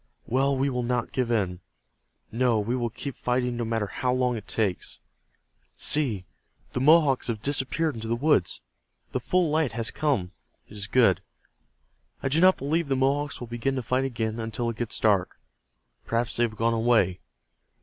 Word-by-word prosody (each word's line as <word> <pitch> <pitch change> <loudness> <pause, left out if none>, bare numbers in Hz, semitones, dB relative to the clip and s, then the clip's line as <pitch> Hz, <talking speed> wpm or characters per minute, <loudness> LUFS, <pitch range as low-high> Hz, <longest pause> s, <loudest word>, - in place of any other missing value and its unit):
Well, 135 +3 +1
we 135 +2 +1
will 125 -2 -1
not 120 -1 -1
give 125 -3 -1
in. 95 -6 0 0.7
No, 120 -1 +2
we 115 +4 -1
will 120 -2 -1
keep 135 +4 -6
fighting 125 0 -1
no 120 - -2
matter 115 -2 -1
how 125 +5 -2
long 125 -1 +1
it 110 - -7
takes. 100 -5 -2 0.8
See, 120 -11 +2 0.5
the 125 - -1
Mohawks 150 -2 +4
have 110 -3 -3
disappeared 145 +3 0
into 115 -1 -6
the 115 - 0
woods. 140 - +1 0.5
The - - -1
full 180 -4 +1
light 155 -6 +1
has 115 0 -2
come. 130 -13 0 0.4
It 105 - -14
is 105 0 -5
good. 125 +1 +3 1.0
I 135 - +1
do 155 +5 +2
not 185 +1 +6
believe 155 +3 -1
the 135 - +1
Mohawks 140 +2 0
will 120 - -5
begin 120 +4 -2
to 130 - -2
fight 130 +3 0
again 115 -3 -2
until 115 +1 -2
it 110 - -11
gets 120 -2 -3
dark. 100 -4 +2 0.7
Perhaps 115 0 0
they 120 - +3
have 110 -2 -6
gone 115 +1 +2
away. 110 -6 +2
120 Hz, 180 wpm, -26 LUFS, 115-135 Hz, 1.0 s, not